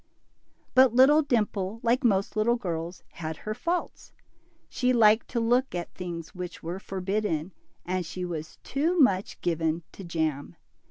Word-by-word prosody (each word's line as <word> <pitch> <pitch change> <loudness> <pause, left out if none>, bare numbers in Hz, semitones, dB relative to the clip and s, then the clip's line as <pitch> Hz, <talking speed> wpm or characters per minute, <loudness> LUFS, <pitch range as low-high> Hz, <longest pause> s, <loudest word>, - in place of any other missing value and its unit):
But 260 -2 +6
little 280 +5 +7
Dimple, 215 -6 -1
like 245 +4 +2
most 200 -4 +2
little 220 +3 +3
girls, 170 -5 -4
had 160 -1 -5
her 215 - -1
faults. 345 +9 -3 0.5
She 255 0 +1
liked 220 -1 +5
to 240 - -2
look 245 0 +1
at 175 -1 -4
things 170 -3 -6
which 180 -1 -7
were 170 +3 -4
for 190 -1 -6
bidden, 190 -3 -1 0.3
and 185 0 -1
she 180 +2 -5
was 160 -3 -6
too 320 +6 0
much 195 -9 +3
given 165 -1 0
to 195 - -10
jam. 155 - -2
195 Hz, 155 wpm, -27 LUFS, 170-240 Hz, 0.5 s, little